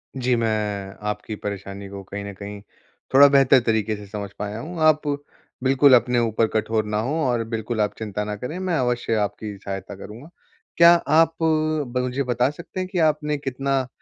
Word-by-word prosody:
जी, 125 Hz, -1 st, +1 dB
मैं 105 Hz, -4 st, -2 dB
आपकी 105 Hz, +1 st, -4 dB
परेशानी 100 Hz, -1 st, -6 dB
को 100 Hz, 0 st, -8 dB
कहीं 100 Hz, +2 st, -7 dB
न 100 Hz, -, -6 dB
कहीं 100 Hz, 0 st, -7 dB, 0.5 s
थोड़ा 140 Hz, +2 st, +9 dB
बेहतर 135 Hz, -1 st, +5 dB
तरीक़े 110 Hz, -1 st, +1 dB
से 105 Hz, 0 st, -10 dB
समझ 100 Hz, 0 st, -6 dB
पाया 105 Hz, +2 st, -4 dB
हूँ। 170 Hz, +6 st, -7 dB
आप 155 Hz, -1 st, +3 dB, 0.6 s
बिल्कुल 135 Hz, +1 st, +5 dB
अपने 120 Hz, 0 st, +2 dB
ऊपर 115 Hz, -1 st, +1 dB
कठोर 110 Hz, 0 st, 0 dB
ना 105 Hz, 0 st, -2 dB
हो 130 Hz, +6 st, -2 dB
और 120 Hz, -3 st, +1 dB
बिल्कुल 110 Hz, 0 st, -2 dB
आप 105 Hz, -, 0 dB
चिंता 105 Hz, -1 st, -3 dB
ना 105 Hz, 0 st, -4 dB
करें, 125 Hz, -, -6 dB
मैं 185 Hz, -2 st, -1 dB
अवश्य 120 Hz, -3 st, 0 dB
आपकी 105 Hz, 0 st, -3 dB
सहायता 95 Hz, 0 st, -6 dB
करूँगा। 110 Hz, +9 st, -11 dB, 0.5 s
क्या 170 Hz, 0 st, +8 dB, 0.2 s
आप 165 Hz, 0 st, +4 dB
ब 155 Hz, -5 st, 0 dB
मुझे 125 Hz, +2 st, -1 dB
बता 125 Hz, +1 st, +1 dB
सकते 170 Hz, +4 st, -8 dB
हैं 185 Hz, -, -2 dB
कि 180 Hz, -, -1 dB
आपने 150 Hz, -1 st, +1 dB
कितना 135 Hz, -1 st, -1 dB
120 Hz, 185 wpm, -23 LUFS, 105-140 Hz, 0.6 s, थोड़ा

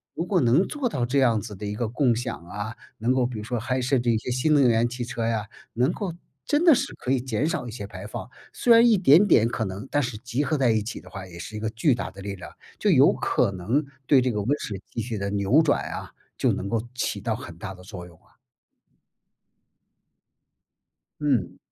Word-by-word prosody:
一 -, -, -33 dB
个 -, -, -2 dB
如 -, -, -1 dB
果 180 Hz, -2 st, +2 dB
能 130 Hz, +10 st, +3 dB
做 275 Hz, -5 st, -2 dB
到 125 Hz, -, -1 dB
这 135 Hz, +3 st, +1 dB
样 115 Hz, -5 st, +3 dB
子 105 Hz, -1 st, -7 dB
的 105 Hz, -, -7 dB
一 105 Hz, -, -3 dB
个 115 Hz, +1 st, -1 dB
共 125 Hz, +1 st, +2 dB
享 120 Hz, +2 st, -3 dB
啊， 105 Hz, +5 st, -6 dB, 0.2 s
能 120 Hz, +4 st, +1 dB
够 130 Hz, -1 st, +2 dB
比 120 Hz, -2 st, -4 dB
如 105 Hz, -, -6 dB
说 120 Hz, +2 st, -2 dB
还 125 Hz, +3 st, -1 dB
设 130 Hz, +2 st, +1 dB
计 120 Hz, -1 st, +1 dB
一 110 Hz, -, +2 dB
些 110 Hz, -, -5 dB
新 130 Hz, +5 st, +2 dB
能 140 Hz, -4 st, +5 dB
源 115 Hz, 0 st, +3 dB
汽 125 Hz, -1 st, -4 dB
车 120 Hz, -2 st, -3 dB
呀， 110 Hz, -2 st, -1 dB, 0.3 s
能 125 Hz, +8 st, +1 dB
够 195 Hz, -5 st, -4 dB, 0.3 s
真 300 Hz, +4 st, +2 dB
的 330 Hz, -, +9 dB
是 270 Hz, +2 st, -2 dB
可 125 Hz, -, -4 dB
以 130 Hz, -2 st, +2 dB
减 130 Hz, +2 st, -1 dB
少 145 Hz, -6 st, -2 dB
一 -, -, -6 dB
些 110 Hz, -3 st, -6 dB
排 95 Hz, -1 st, -9 dB
放。 -, -, -6 dB, 0.2 s
虽 240 Hz, -, +4 dB
然 230 Hz, +1 st, +7 dB
一 220 Hz, -, +5 dB
点 175 Hz, +1 st, +6 dB
点 115 Hz, -, +5 dB
可 120 Hz, -1 st, -2 dB
能 95 Hz, +6 st, -6 dB
但 145 Hz, -, +1 dB
是 120 Hz, -3 st, -4 dB
集 125 Hz, +4 st, -2 dB
合 150 Hz, +2 st, 0 dB
在 130 Hz, -4 st, +3 dB
一 110 Hz, -1 st, +2 dB
起 110 Hz, +5 st, -6 dB
的 -, -, -17 dB
话 95 Hz, 0 st, -8 dB
也 85 Hz, -, -11 dB
是 85 Hz, +6 st, -8 dB
一 105 Hz, -, -4 dB
个 110 Hz, -, -2 dB
巨 115 Hz, +6 st, +2 dB
大 95 Hz, -5 st, -5 dB
的 95 Hz, +1 st, -11 dB
力 100 Hz, 0 st, -5 dB
量， 90 Hz, -, -10 dB, 0.3 s
就 -, -, +2 dB
有 -, -, +6 dB
可 -, -, +1 dB
能 115 Hz, -, 0 dB, 0.2 s
对 140 Hz, -, +6 dB
这 125 Hz, -, +1 dB
个 105 Hz, -, -2 dB
温 110 Hz, -, -3 dB
室 100 Hz, -3 st, -5 dB
气 115 Hz, -, -3 dB
体 115 Hz, -1 st, -4 dB
的 100 Hz, 0 st, -2 dB
扭 100 Hz, +9 st, +3 dB
转 150 Hz, -3 st, +2 dB
啊， -, -, -6 dB, 0.3 s
就 -, -, +2 dB
能 95 Hz, -, -3 dB
够 110 Hz, +1 st, 0 dB
起 -, -, -2 dB
到 -, -, -1 dB
很 85 Hz, -, -9 dB
大 95 Hz, +2 st, -6 dB
的 90 Hz, -, -14 dB
作 90 Hz, -2 st, -9 dB
用 85 Hz, -2 st, -16 dB
啊。 -, -, -30 dB, 2.9 s
嗯。 130 Hz, -11 st, 0 dB
120 Hz, 270 characters per minute, -25 LUFS, 105-135 Hz, 2.9 s, 的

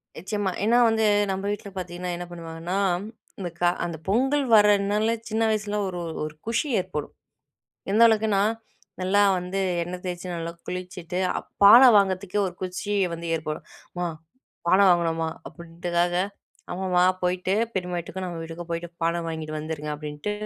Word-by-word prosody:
நிச்சயமா, 195 Hz, +3 st, -2 dB
ஏன்னா 230 Hz, +3 st, +4 dB
வந்து, 220 Hz, 0 st, +2 dB, 0.3 s
நம்ம 190 Hz, +1 st, -3 dB
வீட்ல 205 Hz, 0 st, -5 dB
பாத்தீங்கன்னா 180 Hz, 0 st, -4 dB
என்ன 175 Hz, -, -5 dB
பண்ணுவாங்கன்னா, 170 Hz, +2 st, -4 dB, 0.6 s
இந்த 180 Hz, -3 st, -3 dB
கா 175 Hz, -, +4 dB, 0.2 s
அந்த 170 Hz, -2 st, -4 dB
பொங்கல் 265 Hz, +7 st, +2 dB
வரனால 210 Hz, 0 st, +4 dB, 0.2 s
சின்ன 225 Hz, +1 st, 0 dB
வயசுல 210 Hz, -1 st, -1 dB
ஒரு 180 Hz, -1 st, -4 dB, 0.2 s
ஒரு 155 Hz, 0 st, -5 dB
குஷி 230 Hz, +6 st, 0 dB
ஏற்படும். 180 Hz, -5 st, -5 dB, 0.8 s
எந்த 215 Hz, +3 st, +4 dB
அளவுக்குனா, 215 Hz, -3 st, +3 dB, 0.6 s
நல்லா 190 Hz, +2 st, +3 dB, 0.2 s
வந்து 180 Hz, +2 st, -3 dB, 0.2 s
எண்ணெய் 180 Hz, +1 st, -6 dB
தேச்சு 180 Hz, 0 st, -4 dB
நல்லா 165 Hz, 0 st, -4 dB
குளிச்சுட்டு 180 Hz, -1 st, -5 dB
அ -, -, -1 dB, 0.2 s
பான 205 Hz, +5 st, +10 dB, 0.2 s
வாங்கறதுக்கே 195 Hz, 0 st, +1 dB
ஒரு 175 Hz, -, -10 dB
குச்சி 185 Hz, +2 st, -4 dB, 0.2 s
வந்து 170 Hz, 0 st, -5 dB
ஏற்படும். 155 Hz, -1 st, -4 dB, 0.3 s
"அம்மா 175 Hz, 0 st, -2 dB, 0.6 s
பான 175 Hz, -, +5 dB
வாங்னோமா" 165 Hz, -2 st, +1 dB, 0.2 s
அப்டின்றதுக்காக, 170 Hz, +1 st, -2 dB, 0.6 s
அம்மா 180 Hz, -1 st, +1 dB, 0.2 s
போயிட்டு 180 Hz, +1 st, 0 dB, 0.2 s
பெரிம்மா 180 Hz, -2 st, -2 dB
வீட்டுக்கும், 185 Hz, +2 st, -5 dB
நம்ம 175 Hz, -2 st, -5 dB
வீட்டுக்கும் 165 Hz, +1 st, -8 dB
போயிட்டு 170 Hz, +1 st, -3 dB
பான 170 Hz, +1 st, +1 dB
வாங்கிட்டு 160 Hz, -1 st, -4 dB
வந்துருங்க 150 Hz, -1 st, -5 dB
அப்டின்ட்டு, 150 Hz, +6 st, -5 dB
180 Hz, 145 wpm, -25 LUFS, 170-200 Hz, 0.8 s, பான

